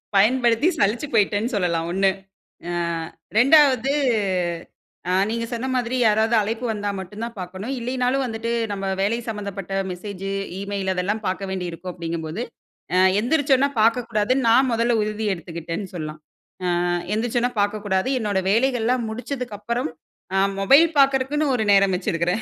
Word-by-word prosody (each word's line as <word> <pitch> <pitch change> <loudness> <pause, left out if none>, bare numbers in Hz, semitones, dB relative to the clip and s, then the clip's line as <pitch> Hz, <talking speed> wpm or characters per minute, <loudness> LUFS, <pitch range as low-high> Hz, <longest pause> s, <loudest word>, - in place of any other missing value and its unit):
பயன்படுத்தி 235 - +4
சலிச்சு 220 +8 +1
போயிட்டேன்னு 215 +2 +1
சொல்லலாம் 170 -4 0
1. 195 +1 +3 0.6
அ - - -2 0.7
2ஆவது 270 -1 +5 1.2
அ - - +1 0.2
நீங்க 230 +1 -2
சொன்ன 235 +3 -3
மாதிரி, 245 0 -1
யாராவது 220 +2 +3
அழைப்பு 225 +4 -2
வந்தா 205 -1 -3
மட்டும் 205 +4 -7
தான் 235 0 -8
பார்க்கணும். 185 +7 -6
இல்லைனாலும் 250 +2 0
வந்துட்டு, 230 -1 -4 0.2
"நம்ம 195 -1 -4 0.2
வேலை 210 +4 +1
சம்பந்தப்பட்ட 200 -3 -5 0.2
மெசேஜு, 195 +1 -6 0.3
இமெயில் 200 -1 -2
அதெல்லாம் 200 +4 -1
பார்க்க 190 +1 -2
வேண்டி 185 -1 -3
இருக்கும்." 175 +2 -7
அப்படீங்கும்போது, 165 +2 -4 0.5
அ - - +4 0.2
"எந்திரிச்சோன்ன 275 +2 +2
பார்க்கக்கூடாதுன்னு 230 +2 +1
நா 230 - +6 0.2
மொதல்ல 230 +1 +2
உறுதி 215 +1 -2
எடுத்துக்கிட்டேன்." 170 +2 -6
சொல்லலாம். 155 -2 -6 0.6
அ - - 0 0.3
எந்திரிச்சோனா 240 +2 0
பார்க்கக்கூடாது. 205 +1 0
என்னோட 205 -4 0
வேலைகள்லாம் 245 +1 +1
முடிச்சதுக்கு 245 -1 -5
அப்புறம் 235 -4 -2 0.4
அ - - +3 0.2
மொபைல் 275 +11 +6
பார்க்கறக்குன்னு 275 +2 +3
ஒரு 220 - 0
நேரம் 195 -1 +5
வச்சிருக்கிறேன். 175 +2 -1
215 Hz, 135 wpm, -23 LUFS, 195-245 Hz, 1.2 s, நா